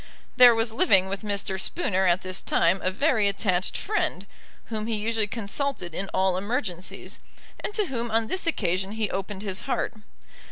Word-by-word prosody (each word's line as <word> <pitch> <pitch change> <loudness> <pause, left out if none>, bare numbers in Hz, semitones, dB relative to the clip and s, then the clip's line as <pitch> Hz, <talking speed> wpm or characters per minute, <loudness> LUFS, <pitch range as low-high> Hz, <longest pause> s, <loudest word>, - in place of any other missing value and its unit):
There 245 -2 +8
was 225 0 0
living 190 -4 +4
with 195 0 -3
Mr. 200 -2 -2
Spooner 190 - +1
at 175 +1 +2
this 185 0 -3
time 170 +3 +2
a 185 - +1
very 220 +1 +2
attached 190 -2 0
friend, 425 +1 -1 0.4
whom 220 -1 -4
he 230 - 0
usually 220 0 0
consulted 210 - -3
in 195 +3 -3
all 190 -1 +2
emergencies, 190 -3 -4 0.4
and - - -4
to 425 - +1
whom 240 -6 -3
on 225 0 +1
this 370 +8 -2
occasion 190 - 0
he 220 -2 -2
opened 195 +1 -4
his 190 -2 -2
heart. - - 0
205 Hz, 170 wpm, -26 LUFS, 190-230 Hz, 0.4 s, There